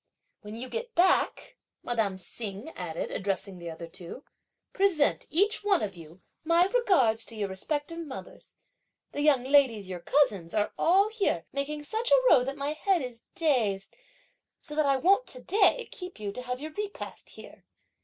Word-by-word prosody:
"When 210 +1 -8
you 245 +3 -6
get 470 - -5
back," 365 +1 +2 0.3
madame 220 -5 0
Hsing 205 - -7
added, 170 -2 -4
addressing 195 -1 -3
the 170 -1 -6
other 165 +1 -7
two, 170 - -9 0.5
"present, 380 -7 +2
each 410 +7 +2
one 400 -3 +3
of 195 -2 -3
you, 165 +2 -14 0.2
my 335 +2 +4
regards 365 - +3
to 230 - -9
your 205 -2 -2
respective 290 - -3
mothers. 295 -5 -9 0.5
The 290 - -3
young 290 -4 +4
ladies, 255 -8 +3
your 180 -1 -5
cousins, 205 - +1
are 210 -1 +1
all 390 +5 +4
here 405 - -1
making 295 +2 -3
such 445 +9 -2
a - - +5
row 250 - +6
that 275 +2 -4
my 285 +1 -2
head 355 +1 +1
is 240 -2 -8
dazed, 235 - 0 0.6
so 300 - -7
that 300 -1 +2
I 275 - +4
won't 395 - +3
to - - -7
day 440 +4 +3
keep 360 - -8
you 205 -1 -3
to 250 - -7
have 250 0 -4
your 310 +2 -6
repast 410 +4 -6
here." - - -13
280 Hz, 175 wpm, -28 LUFS, -, 0.6 s, row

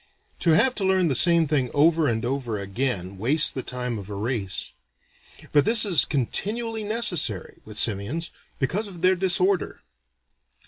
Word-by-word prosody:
To 165 -2 +3
have 260 +10 +3
to 205 - -2
learn 190 -3 +2
the 135 - 0
same 170 +2 +4
thing 140 -4 -1
over 155 +1 +3
and 115 0 -2
over 125 -4 -3
again 100 -2 -4
wastes 145 +9 +4
the 130 - -5
time 125 -3 -4
of 100 0 -10
a 100 - -6
race. 105 -2 -3 0.8
But 145 - +4
this 225 0 +5
is 180 -7 +3
continually 220 - -2
necessary, 185 - 0
with 110 -1 -8
simians, 115 - -1 0.3
because 195 +11 -2
of 180 -3 -12
their 185 +1 +4
disorder. 185 0 0
150 Hz, 155 wpm, -24 LUFS, 115-185 Hz, 0.8 s, this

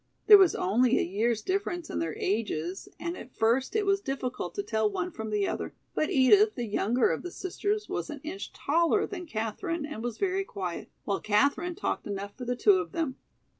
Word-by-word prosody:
There 415 -2 +10
was 375 -3 +5
only 240 +7 +3
a - - +2
year's 215 +4 0
difference 365 -3 -2
in - - -3
their 165 -2 -2
ages, 190 -4 -2
and 340 +1 -3
at 250 - -11
first 240 - +1
it 425 -2 +2
was 395 0 +2
difficult 270 -5 -4
to 405 - -2
tell 220 - +1
one 360 - -2
from 220 -7 -6
the 210 -2 +1
other, - - -4 0.2
but 310 - 0
Edith, 405 - +5
the 245 - -2
younger 225 +3 +2
of - - -2
the 355 - -6
sisters, 410 +4 -2
was - - -3
an 295 -2 -6
inch 360 +6 -6
taller 335 +7 +2
than 360 -4 -7
Katherine 290 - -3
and 290 -7 -6
was 240 -2 -3
very 390 0 0
quiet, 185 - -5
while 200 - -1
Katherine 285 +11 +1
talked 370 - -3
enough 200 0 -5
for 250 - -7
the 245 +1 -1
two 205 -5 +5
of 175 -2 -5
them. 305 -6 -2
260 Hz, 205 wpm, -28 LUFS, 215-355 Hz, 0.2 s, There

